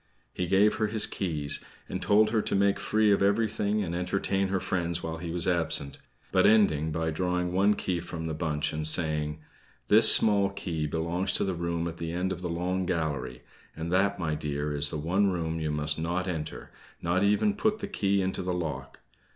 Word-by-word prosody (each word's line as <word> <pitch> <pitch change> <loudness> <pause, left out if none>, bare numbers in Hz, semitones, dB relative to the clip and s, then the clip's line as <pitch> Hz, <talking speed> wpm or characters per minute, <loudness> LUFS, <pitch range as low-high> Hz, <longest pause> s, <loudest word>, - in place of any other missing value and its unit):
He 90 - -2
gave 100 +4 +3
her 110 0 +1
his 105 0 0
keys, 75 -7 -2 0.2
and - - -4
told 105 +1 +4
her 110 -2 +2
to - - -1
make 100 0 +2
free 110 -1 +2
of 100 - +3
everything 105 0 +1
and 85 -3 -4
entertain 95 +2 0
her 95 0 0
friends 85 -2 -2
while 80 0 -4
he 85 +1 -6
was 85 0 0
absent, 80 -5 0 0.3
but 95 - +4
ending 80 -8 +3
by 80 +1 -1
drawing 90 +1 -1
one 100 +3 +3
key 90 -3 -2
from 85 -1 -6
the 80 - -3
bunch 75 -2 -2
and 75 0 0
saying: 75 -1 +1 0.5
"This - - +8
small 100 -2 +3
key 80 -5 -3
belongs 85 +4 -1
to - - +1
the 95 -2 -1
room 85 0 -2
at 85 0 -6
the 80 0 -4
end 90 +2 -1
of 90 - -8
the 90 - -3
long 90 +2 -2
gallery 75 -8 -3 0.3
and 80 +2 -5
that, 100 +2 +2
my 80 -3 -2
dear, 75 -1 -3
is 75 0 0
the 75 - -4
one 95 +7 +1
room 80 -2 -2
you 80 -1 -2
must 75 0 -1
not 90 +3 -2
enter, 80 -4 -5 0.3
nor 85 +3 0
even 105 - +3
put 215 +1 0
the 200 - -5
key 100 - 0
into 95 0 -2
the 90 -1 -2
lock. 70 -6 -5
90 Hz, 205 wpm, -28 LUFS, 80-100 Hz, 0.5 s, This